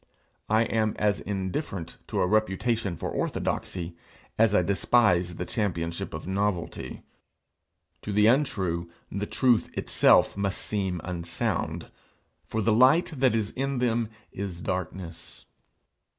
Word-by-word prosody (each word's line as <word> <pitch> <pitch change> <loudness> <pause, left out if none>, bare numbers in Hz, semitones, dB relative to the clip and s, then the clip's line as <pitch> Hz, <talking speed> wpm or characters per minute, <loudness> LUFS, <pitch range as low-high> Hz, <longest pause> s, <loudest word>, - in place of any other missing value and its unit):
I 110 +1 +4
am 110 -2 0
as 105 -2 +1
indifferent 95 - -4
to - - -1
a - - +4
reputation 110 -1 +1
for - - -4
orthodoxy 85 -2 -2 0.4
as 110 -2 +4
I 90 - +4
despise 95 -2 +3
the 90 - -4
championship 85 -7 -2
of 80 - -7
novelty. 95 -1 -2 1.0
To 105 - -5
the 105 +1 +4
untrue, 95 - +1 0.2
the 100 +1 -3
truth 125 -4 +2
itself - - +4
must 100 0 -1
seem 95 -5 -2
unsound, 85 -1 -3 0.6
for 110 -1 -1
the 110 - +3
light 135 +10 +5
that 130 -3 +3
is 110 -2 -1
in 135 0 -2
them 120 -2 +1 0.2
is 95 -3 -5
darkness. 90 -2 -5
100 Hz, 125 wpm, -27 LUFS, 90-115 Hz, 1.0 s, light